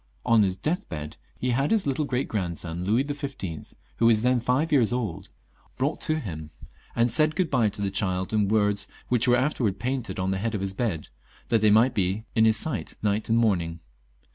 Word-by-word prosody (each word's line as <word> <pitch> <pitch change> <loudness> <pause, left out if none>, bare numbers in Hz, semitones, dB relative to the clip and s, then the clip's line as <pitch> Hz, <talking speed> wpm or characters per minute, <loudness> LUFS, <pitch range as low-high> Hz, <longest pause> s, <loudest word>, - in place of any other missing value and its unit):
On 115 -2 +5
his 95 -2 +1
death 160 - -2
bed 75 0 -6 0.2
he 125 - -1
had 135 +4 +1
his 220 -3 +2
little 140 +2 0
great 130 -1 -1
grandson 85 -3 -3
Louis 110 +7 +2
XV., 140 - -6 0.2
who 115 - +4
was 110 -1 +4
then 125 0 +3
five 130 +7 0
years 125 -7 +4
old, 100 -7 -3 0.5
brought - - -1
to 155 0 0
him, 80 - -6 0.5
and 120 0 +2
said 155 +3 +3
good 185 -4 0
bye 125 -5 +3
io - - +3
the 100 -1 -2
child 95 -1 -1
in 105 -2 +2
words 105 -1 +2 0.2
which 125 0 +2
were 125 0 +5
afterwards 125 -7 0
painted 125 -1 -3
on 95 +1 0
the 95 - -1
head 110 +2 -2
of 100 - -2
his 95 -1 -2
bed, 95 -7 -2 0.4
that 115 -2 +3
they 110 - +5
might 115 +5 +5
be 100 +3 -1
in 110 -1 +4
his 110 0 +4
sight 115 - -4
night 105 +1 0
and 115 - +3
morning. 85 -8 +1
110 Hz, 210 wpm, -26 LUFS, 95-125 Hz, 0.5 s, On